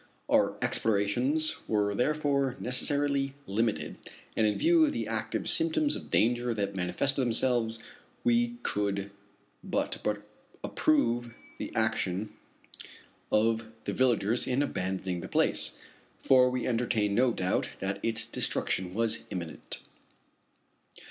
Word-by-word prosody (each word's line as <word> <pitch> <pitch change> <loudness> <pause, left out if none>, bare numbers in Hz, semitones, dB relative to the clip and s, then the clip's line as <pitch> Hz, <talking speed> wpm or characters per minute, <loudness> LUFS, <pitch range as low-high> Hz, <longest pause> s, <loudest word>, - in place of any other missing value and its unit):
Our - - +2
explorations 125 +10 +2
were 105 -2 +1
therefore 140 +1 +1
necessarily 140 +2 0
limited, 100 -7 -1 0.4
and 110 - +3
in 105 - 0
view 335 0 +4
of 300 - +2
the - - -3
active - - -3
symptoms 315 -3 +3
of - - -8
danger 120 +1 +2
that 100 -2 -2
manifested 95 +9 0
themselves, 120 -2 +1 0.5
we 240 0 +2
could 100 -1 -1 0.5
but - - -2 0.6
approve 120 - +1 0.2
the - - -5
action 105 -2 -1 1.0
of 115 +1 +2 0.2
the - - -3
villagers 120 -3 +2
in 130 +3 +1
abandoning 95 -6 -3
the - - -7
place; - - +1 0.4
for 130 -1 +5
we 125 -1 -2
entertained 115 -4 0
no 125 +3 +3
doubt 90 -4 -1
that 95 +1 -3
its 115 -1 0
destruction 90 0 -1
was 115 0 0
imminent. 85 -3 -6
115 Hz, 115 wpm, -29 LUFS, 100-135 Hz, 1.0 s, for